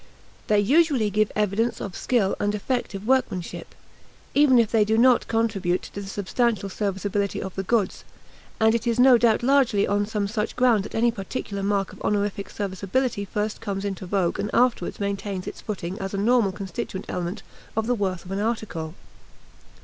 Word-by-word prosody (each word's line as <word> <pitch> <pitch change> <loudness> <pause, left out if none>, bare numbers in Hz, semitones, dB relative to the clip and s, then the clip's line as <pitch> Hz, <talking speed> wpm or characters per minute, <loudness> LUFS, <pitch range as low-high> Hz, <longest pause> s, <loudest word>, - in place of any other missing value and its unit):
They 210 -1 +4
usually 265 -1 +3
give 215 +1 +1
evidence 210 +3 0
of 195 - -6
skill 220 -6 +1
and 205 0 0
effective 210 -2 -3
workmanship, 225 -9 -1 0.6
even 285 -3 +5
if 230 -2 +3
they 225 -2 +4
do 220 +1 +1
not 245 +1 +5
contribute 205 -6 0
to 200 - -7
the 195 - -8
substantial 205 +1 0
serviceability 200 0 -2
of 190 - -5
the 195 - -2
goods; 200 0 0 0.6
and 220 0 +4
it 230 +1 -1
is 235 0 +1
no 250 -1 +7
doubt 230 -1 +3
largely 255 -6 +3
on 205 0 +1
some 210 -2 -1
such 210 +1 -2
ground 240 -5 +3
that - - -8
any 235 +1 +3
particular 200 -1 -5
mark 200 -1 0
of - - -14
honorific 205 -1 -1
serviceability 200 +3 -2
first 210 +2 -3
comes 200 -2 -3
into 195 -2 -4
vogue 180 -2 0
and 210 - -1
afterward 245 0 +1
maintains 200 -2 -3
its - - -7
footing 190 -1 -5
as 195 0 -4
a - - -2
normal 220 0 +3
constituent 190 0 -5
element 180 +3 -4 0.3
of 220 - +1
the 245 - +1
worth 190 -6 -2
of 180 - -9
an 195 - -2
article. 205 -8 -3
205 Hz, 180 wpm, -24 LUFS, 195-230 Hz, 0.6 s, no